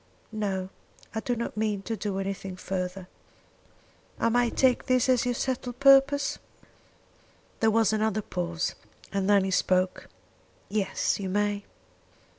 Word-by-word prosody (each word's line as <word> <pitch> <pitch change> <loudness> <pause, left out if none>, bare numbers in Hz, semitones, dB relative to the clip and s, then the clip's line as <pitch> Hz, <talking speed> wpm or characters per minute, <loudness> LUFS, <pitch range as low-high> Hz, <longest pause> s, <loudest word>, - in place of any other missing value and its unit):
"No; 195 -4 -2 0.4
I 220 - -1
do 245 +2 -1
not 235 0 -4
mean 210 -2 -1
to 225 - -3
do 205 -3 -3
anything 195 -1 -4
further." 185 0 -4 1.1
"I 230 - +2
may 240 +1 +3
take 255 +1 +2
that 255 -1 +3
as 255 -2 +3
your 245 -1 0
settled 250 -1 -3
purpose?" 275 +1 +5 1.2
There 225 - +4
was 220 -1 +3
another 215 -1 0
pause, 175 -2 -2 0.4
and 195 0 0
then 200 -2 +5
he 190 - -1
spoke, 185 0 +1 0.6
"Yes; 205 -1 0
you 195 -2 -3
may." 205 +1 0
210 Hz, 135 wpm, -27 LUFS, 190-240 Hz, 1.2 s, purpose